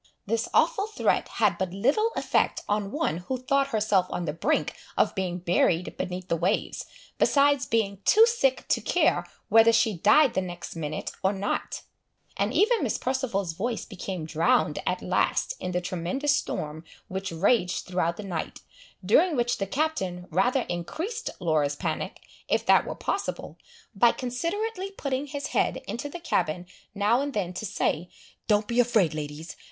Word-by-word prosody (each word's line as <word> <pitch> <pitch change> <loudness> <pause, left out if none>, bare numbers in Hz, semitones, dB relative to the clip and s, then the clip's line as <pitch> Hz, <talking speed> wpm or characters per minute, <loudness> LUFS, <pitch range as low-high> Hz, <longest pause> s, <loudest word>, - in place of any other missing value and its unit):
This 230 +3 -1
awful 430 -4 +2
threat 435 - 0
had 205 -7 +1
but 190 -2 -2
little 280 - +2
effect - - +1
on 205 -1 0
one 300 - -1
who 220 +9 -4
thought 275 +2 +1
herself 210 -6 +2
on 175 - -3
the 150 - -2
brink 250 - 0 0.2
of - - +3
being 185 -3 -2
buried 175 0 +1
beneath 180 0 -4
the - - +1
waves, 180 +6 -1 0.3
besides 285 -1 +3
being 200 -4 0
too 440 +2 +7
sick 460 - +1
to - - +2
care - - +2 0.2
whether 225 0 +7
she 225 -1 +3
died 250 - +5
the 190 - +1
next 175 -2 -7
minute 155 -2 -4
or 190 - +2
not; 200 +1 -3 0.5
and - - 0
even 450 +3 +3
Miss - - 0
Perceval's 235 -9 -1
voice 225 +7 -3
became 185 -4 -5
drowned 160 +1 +2
at - - -1
last - - +1
in - - -4
the 180 - 0
tremendous 185 - 0
storm 155 - -4 0.2
which 190 0 -4
raged 180 +2 +1
throughout 175 -2 -1
the 210 - -6
night, 180 -5 -5 0.4
during 315 - +4
which 240 -1 0
the 195 - -1
Captain 195 - -2
rather 250 - +2
increased 310 - -4
Laura's 155 -5 +1
panic, - - -4 0.3
if - - +1
that - - +5
were - - -4
possible, - - -3 0.4
by 230 +3 +5
considerately 370 - -3
putting 280 -7 -3
his 285 0 -5
head - - +1
into 265 +5 -4
the 345 - -7
cabin 175 - -1 0.3
now 210 +5 +3
and 285 0 -3
then 185 -4 -1
to 215 +4 -4
say, 180 -3 -1 0.4
"Don't 210 -1 +3
be 235 +2 0
afraid, 225 -9 +3
ladies! 155 +2 -6
210 Hz, 165 wpm, -27 LUFS, 180-275 Hz, 0.5 s, too